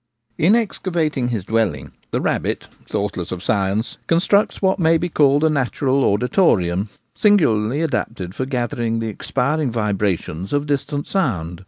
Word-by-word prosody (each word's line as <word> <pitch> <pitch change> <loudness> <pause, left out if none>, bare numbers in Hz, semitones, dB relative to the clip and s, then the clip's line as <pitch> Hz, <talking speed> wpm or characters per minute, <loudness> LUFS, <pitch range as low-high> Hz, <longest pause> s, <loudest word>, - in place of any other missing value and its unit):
In 185 +8 +5
excavating 170 - -1
his 115 -6 -2
dwelling, 90 -13 -1 0.2
the - - -1
rabbit, - - -1 0.2
thoughtless 100 -3 -3
of 90 0 -5
science, 100 +2 -1
constructs 200 +5 +2
what 190 0 +1
may 165 -1 +4
be 175 +2 -2
called 145 -2 +3
a - - +5
natural 135 -1 +1
auditorium 100 - +2 0.2
singularly 145 - +2
adapted 95 - -3
for 130 +5 -3
gathering 120 -3 -1
the 115 0 -2
ex 105 - -9
piring 145 +2 +1
vibrations 100 - -2
of 145 0 +1
distant 145 0 -2
sound. 90 - -1
125 Hz, 145 wpm, -20 LUFS, 100-155 Hz, 0.2 s, In